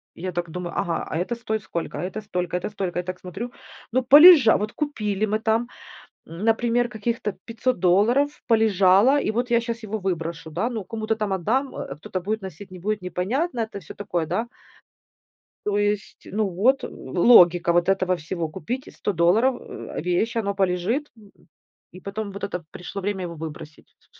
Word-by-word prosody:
И - - -12
я 185 - -3
так 175 -1 -3
думаю: 175 +1 -5
"Ага, 170 - -1
а - - -1
это 185 +8 -2
стоит 220 -2 -3
сколько, 170 -5 -4
а - - -3
это 190 +4 -4
столько, 180 -4 -2
это 180 - -4
столько". 190 -4 -3
Я - - -2
так 185 0 -6
смотрю, 195 +7 -6 0.4
ну 260 - +3
полежа 290 -2 +9
вот 210 +2 -3
купили 215 -9 -1
мы 215 +1 -1
там, 225 +2 +1 0.6
м, 165 +4 -8
например, 235 +2 +2
каких-то 220 -2 -2
500 235 +1 -1
долларов 225 +11 +3
полежало, 220 +2 +4
и - - -1
вот 240 +2 -2
я 235 0 +4
щас 230 -1 -5
его 215 +1 -3
выброшу, 165 -3 -3
да, 180 +10 -1
ну 220 -4 -4
кому-то 220 +2 -2
там 210 -2 -2
отдам, 250 +10 0
э, 135 - -6
кто-то 185 +4 -5
будет 215 +4 -2
носить, 190 +1 -9
не 185 - -9
будет, 210 +2 -2
непонятно, 235 - -2
это 220 -1 -5
всё 165 - -11
такое, 180 -5 -2
да. 190 +9 -2 1.2
То 205 -1 0
есть, 205 0 -1
ну 210 +1 -1
вот 230 +10 +2
логика 175 - +4
вот 175 0 +2
этого 185 -1 +2
всего: 165 0 -4
купить 240 +10 -5
за - - -12
100 205 - -3
долларов, 200 +10 +3
э, - - -7
вещь, 180 +8 0
оно 200 -3 -1
полежит, 195 +9 0
м, 205 -2 -18 0.6
и 185 - -11
потом 200 +2 -5
вот 200 +1 -9
это 180 -3 -3
пришло 195 +3 -7
время 195 -1 -2
его 170 -1 -5
выбросить 155 -1 -9
с - - -26
200 Hz, 190 wpm, -24 LUFS, 180-230 Hz, 1.2 s, полежа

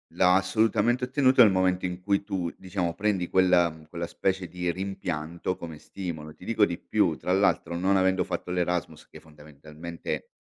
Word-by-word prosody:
La 90 0 +5
assolutamente 110 +6 +2
ottenuto 130 0 +4
nel 110 -4 +8
momento 95 0 +1
in 90 0 -4
cui 100 +1 +1
tu, 95 -5 -3
diciamo, 90 -2 -2
prendi 100 -4 0
quella, 90 -2 +4
mhmm 80 -1 -14
quella 85 +1 -5
specie 95 +1 -1
di 90 +1 -3
rimpianto 85 -2 -3
come 80 -3 -8
stimolo. 80 -5 -7
Ti - - -17
dico 105 0 +3
di 85 -2 -4
più: 90 -7 +1
tra 90 - -3
l'altro 95 -2 +2
non 95 +2 +2
avendo 95 -1 +2
fatto 90 - -4
l'Erasmus 90 -1 -2
che - - -14
fondamentalmente, 75 +2 -8
90 Hz, 170 wpm, -27 LUFS, 85-95 Hz, -, nel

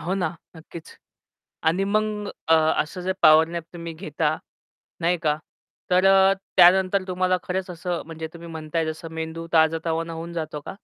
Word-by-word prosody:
हो 175 +6 -2
ना 175 -3 -1 0.2
नक्कीच 160 0 -12 0.7
आणि 180 +4 +2
मग 210 0 -1 0.2
अ, 160 - +5 0.3
असं 180 +4 -7
जे 190 +1 -1
पॉवर 155 +1 +7
नॅप 170 0 -5
तुम्ही 170 -1 -7
घेता 155 -3 -2 0.6
नाही 175 +1 +2
का? 150 -1 +2 0.5
तर 180 +1 +4
अ, 195 0 +6 0.2
त्यानंतर 190 +2 +5
तुम्हाला 185 0 +1
खरंच 185 0 -3
असं 175 0 -4
म्हणजे 160 -1 -6
तुम्ही 170 0 -10
म्हणताय 160 0 -3
जसं 160 +1 -5
मेंदू 160 +1 -5
ताजातवाना 165 +1 +1
होऊन 165 +1 -6
जातो 155 -3 -4
का? - - -5
170 Hz, 160 wpm, -24 LUFS, 160-185 Hz, 0.7 s, पॉवर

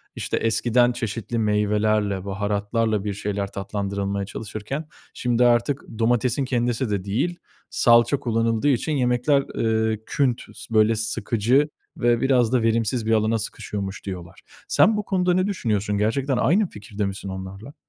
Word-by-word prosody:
işte, - - -2
eskiden 120 +2 +2
çeşitli 115 -1 -3
meyvelerle, 105 -2 +1
baharatlarla 105 +2 -1
bir 105 -1 -2
şeyler 100 0 -3
tatlandırılmaya 100 0 -3
çalışırken 110 +8 -6 0.3
şimdi 125 0 +1
artık 120 +4 +2 0.2
domatesin 120 +3 +1
kendisi 120 -1 0
de 100 -3 -1
değil, 125 - -1 0.3
salça 120 +3 +4
kullanıldığı 115 +2 0
için 140 +3 +1
yemekler, 135 +1 +2
eee, 110 -1 +1
küntüz, 130 -4 -2
böyle, 110 0 +4
sıkıcı 115 +5 +1 0.3
ve 120 -1 +2
biraz 125 -3 +3
da 125 - +3
verimsiz 115 +1 +1
bir 115 - 0
alana 110 +1 +2
sıkışıyormuş 100 -2 -5
diyorlar. 90 -2 -7 0.3
Sen 220 -1 +4
bu 210 - -1
konuda 180 -2 +1
ne 185 +2 +2
düşünüyorsun? 105 - -1
Gerçekten 130 +5 0
aynı 185 +9 +2
fikirde 105 0 -5
misin 100 0 -5
onlarla? 95 +7 -8
115 Hz, 140 wpm, -23 LUFS, 105-125 Hz, 0.3 s, salça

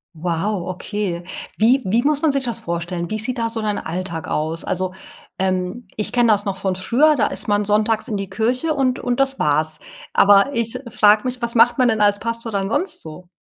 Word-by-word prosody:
Wow! 175 +3 -2
Okay. 185 -1 -4 0.3
Wie 245 +5 +4
wie 215 +5 +2
muss 295 0 +1
man 315 - +3
sich 275 -1 -1
das 235 - -2
vorstellen? 170 0 -4
Wie 215 - -2
sieht 250 +3 -2
da 230 -1 -1
so 225 0 -3
dein 210 -1 -1
Alltag 170 -1 -5
aus? 160 +2 -2
Also, 185 0 -2 0.4
ähm, 185 +4 -2
ich 210 - -2
kenne 240 -2 +3
das 205 0 +2
noch 195 -1 -2
von 190 -1 -1
früher, 255 +11 +3
da 255 - +2
ist - - -5
man 205 0 +1
sonntags 215 +2 +1
in 215 -4 -2
die 195 -1 -5
Kirche 245 +10 0
und 265 -3 0
und 245 0 -2
das 270 0 +2
war's. 155 +1 +1 0.4
Aber 205 +7 +5
ich 230 +1 -1
frag 210 -1 +4
mich, 250 0 -3
was 235 0 -2
macht 235 +1 +5
man 250 -1 +4
denn 220 -1 0
als 205 0 +3
Pastor 230 0 -3
dann 195 -1 -1
sonst 360 - -1
so? 165 +3 -10
210 Hz, 215 wpm, -20 LUFS, 185-240 Hz, 0.4 s, Aber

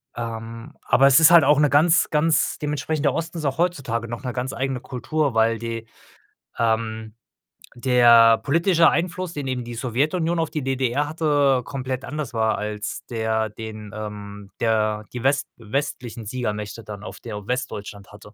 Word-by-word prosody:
Ähm, 115 +3 -6
aber 135 +2 +4
es 140 +1 +6
ist 160 +1 +7
halt 170 -3 +8
auch 145 +1 +4
'ne 150 -1 +4
ganz 160 +4 +4
ganz 155 +1 +1
dementsprechend 150 +1 -2
der 140 - +3
Osten 165 +1 -4
ist 155 - -4
auch 135 -1 -1
heutzutage 130 -10 -1
noch 120 +3 -6
'ne 125 - -3
ganz 130 +1 -3
eigene 130 +1 -2
Kultur, 135 +4 -2
weil 115 0 +2
die, 115 0 -5 0.7
ähm 110 -1 -1 0.6
der 120 -2 +6
politische 165 +3 +3
Einfluss, 180 0 -2
den 145 -3 -5
eben 130 -2 -2
die 120 0 -7
Sowjetunion 155 +8 0
auf 165 -2 0
die 155 - -4
DDR 135 +2 0
hatte, 145 -4 +2
komplett 130 -1 -4
anders 150 -5 -5
war 110 -1 +1
als 105 0 -5
der 110 -1 -1
den, 110 -1 -8
ähm, 105 -1 -8
der 110 -2 0
die 125 - -5
west 135 +1 +2
westlichen 120 -1 -4
Siegermächte 105 -2 -4
dann 105 -1 -9
auf - - -9
der 105 -3 -7
Westdeutschland 105 -5 -5
hatte. 105 0 -14
125 Hz, 165 wpm, -23 LUFS, 110-145 Hz, 0.7 s, halt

